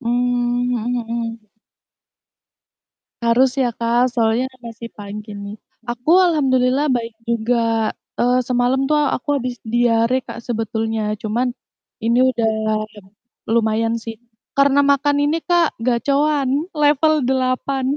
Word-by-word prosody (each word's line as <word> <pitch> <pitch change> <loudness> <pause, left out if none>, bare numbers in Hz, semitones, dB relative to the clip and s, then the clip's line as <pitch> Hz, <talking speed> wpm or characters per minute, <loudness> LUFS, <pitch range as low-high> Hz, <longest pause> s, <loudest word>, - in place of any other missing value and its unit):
Mmm, 245 0 0
mhm 240 0 -2
mhm. 230 -1 -5 1.8
Harus 240 +3 +4
ya, 245 - +2
Kak, 235 +2 +1
soalnya 230 +1 +1 0.2
masih 230 0 -8
pagi 210 +1 -8
nih. 200 +1 -7 0.3
Aku 245 +6 -2 0.2
alhamdulillah 270 -3 +2
baik 235 -2 -1
juga. 230 -1 +1 0.3
Eee, 245 +1 +3
semalam 250 +1 +1
tuh 300 - +4 0.2
aku 260 - -7
habis 250 -1 -4
diare, 235 +1 +2
Kak, 235 - -7
sebetulnya, 220 -2 -2
cuman 235 +4 0 0.5
ini 235 +2 +2
udah 230 -3 0 1.0
lumayan 225 0 +1
sih. 225 0 -7 0.4
Karena 280 0 +4
makan 285 +1 +2
ini, 315 +3 +1
Kak, 345 -2 +1
Gacoan 275 +4 +1 0.3
level 300 +1 +3
8. 260 +1 0
245 Hz, 115 wpm, -20 LUFS, 230-260 Hz, 1.8 s, Harus